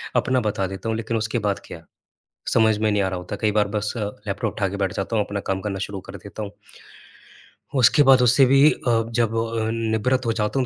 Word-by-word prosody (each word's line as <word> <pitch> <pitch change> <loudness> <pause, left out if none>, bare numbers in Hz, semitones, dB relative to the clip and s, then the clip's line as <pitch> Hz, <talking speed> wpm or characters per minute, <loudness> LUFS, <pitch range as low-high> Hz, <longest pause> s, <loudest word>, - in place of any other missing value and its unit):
अपना 130 0 +2
बता 100 -3 -1
देता 95 +4 -6
हूँ। 110 - -1
लेकिन 115 +1 -2
उसके 110 0 -1
बाद 100 -2 -1
क्या? 80 0 -11 0.7
समझ 110 -1 +4
में 110 0 +1
नहीं 105 -1 +1
आ 95 - 0
रहा 95 -1 -3
होता 90 +3 -6
कई 105 +1 0
बार 105 -1 +2
बस 105 0 -2
अ, - - -3 0.3
लैपटॉप 100 -1 -2
उठा 100 -2 -1
के 100 - -5
बैठ 95 -2 -1
जाता 100 +3 -2
हूँ, 105 - +2
अपना 100 0 -4
काम 95 0 -1
करना 100 -1 -4
शुरू 95 0 -5
कर 100 - -7
देता 100 +3 -9
हूँ। 100 - -5 1.3
उसके 135 +3 +5
बाद 135 -2 +6
उससे 125 +2 +5
भी 135 +3 +6
अ, 115 -2 0
जब 115 -1 +1
अ, 115 -1 -1
निवृत 115 +3 0
हो 115 - +1
जाता 110 +4 -1
हूँ 130 - +1
110 Hz, 235 wpm, -23 LUFS, 100-115 Hz, 1.3 s, बाद